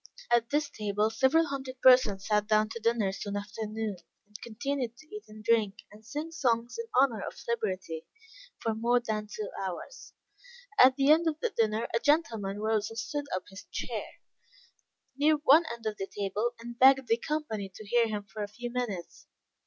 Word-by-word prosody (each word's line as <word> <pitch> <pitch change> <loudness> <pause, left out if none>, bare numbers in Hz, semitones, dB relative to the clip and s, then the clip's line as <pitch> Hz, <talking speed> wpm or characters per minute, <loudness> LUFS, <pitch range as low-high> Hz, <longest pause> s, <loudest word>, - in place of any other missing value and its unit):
At 235 -1 +3
this 295 +2 +1
table 210 +1 -1
several 280 +8 +3
hundred 265 -3 -6
persons 250 -7 +5
sat 210 -1 +1
down 215 0 +3
to 230 - -6
dinner 225 -3 +1
soon 200 +1 -5
after 205 +2 -5
noon, 215 -2 -3 0.3
and 210 0 -13
continued 240 +1 -3
to 310 +8 -13
eat 425 - -8
and 215 0 -12
drink, 220 -3 +1
and 210 +1 -15
sing 295 +8 -5
songs 245 - 0
in 465 - -4
honor 245 -6 +3
of - - -6
liberty, 185 -8 -3 0.5
for 225 - -1
more 235 +3 +2
than 215 -3 -3
two 210 0 -6
hours. 190 - -7 0.7
At 260 0 +8
the 275 +1 +4
end 325 +2 +5
of 310 -1 -1
the 475 - -1
dinner 225 - 0
a 230 - +2
gentleman 230 -10 +1
rose 215 0 0
and 225 - -10
stood 290 +5 -3
upon 185 - -2
his 190 - -10
chair, - - -4 1.1
near 305 +2 +4
one 300 +2 +5
end 235 -1 -8
of 215 -1 -2
the 195 - -4
table, 205 +5 -2
and 235 0 -9
begged 265 0 +6
the 230 - +3
company 230 -9 -3
to 215 - -10
hear 235 +2 +3
him 210 -2 -3
for 210 +2 -8
a 205 - -2
few 240 +4 -7
minutes. 195 - -4
230 Hz, 190 wpm, -29 LUFS, 210-265 Hz, 1.1 s, At